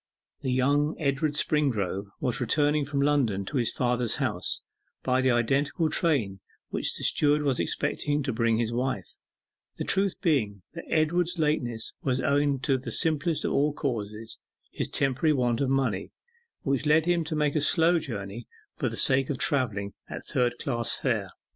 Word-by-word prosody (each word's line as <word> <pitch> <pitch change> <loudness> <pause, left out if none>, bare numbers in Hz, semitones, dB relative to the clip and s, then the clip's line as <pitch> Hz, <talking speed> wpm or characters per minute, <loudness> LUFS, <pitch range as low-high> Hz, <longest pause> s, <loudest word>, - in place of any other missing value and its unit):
The 130 - -1
younger 145 +4 +2
Edward 145 0 0
Springrove 120 - 0
was 125 +1 -2
returning 145 +4 +2
from 140 0 -1
London 125 -10 +1
to 140 - -3
his 120 -3 +1
father's 125 -2 0
house - - -2 0.4
by 130 0 +2
the 130 - +2
identical 140 +7 +1
train 120 - +1 0.3
which - - 0
the - - -6
steward 150 0 +3
was 135 -4 +1
expecting 145 - -1
to 135 -2 -2
bring 115 0 +2
his 115 0 -1
wife, 125 -6 -2 0.7
the - - -2
truth 195 -1 +1
being 110 - 0
that 170 - -8
Edward's 170 +3 +1
lateness 125 -8 -1
was 130 -1 0
owing 140 0 +2
to 135 0 +1
the 125 - -6
simplest 160 0 +1
of - - 0
all 145 +1 +2
causes, 110 -5 -4 0.3
his - - -3
temporary 140 +3 +1
want 120 -3 +1
of 135 - +1
money, 130 -8 0 0.5
which 140 +1 0
led 155 +1 +4
him 175 -1 +2
to 160 0 -3
make 150 -1 +1
a 155 - +2
slow 165 +3 +4
journey 105 -4 -6 0.3
for - - -1
the - - -5
sake 135 0 +3
of 140 - -1
travelling 110 - 0 0.2
at - - -7
third 120 -1 +1
class 120 -4 0
fare. - - -1
135 Hz, 170 wpm, -27 LUFS, 120-150 Hz, 0.7 s, led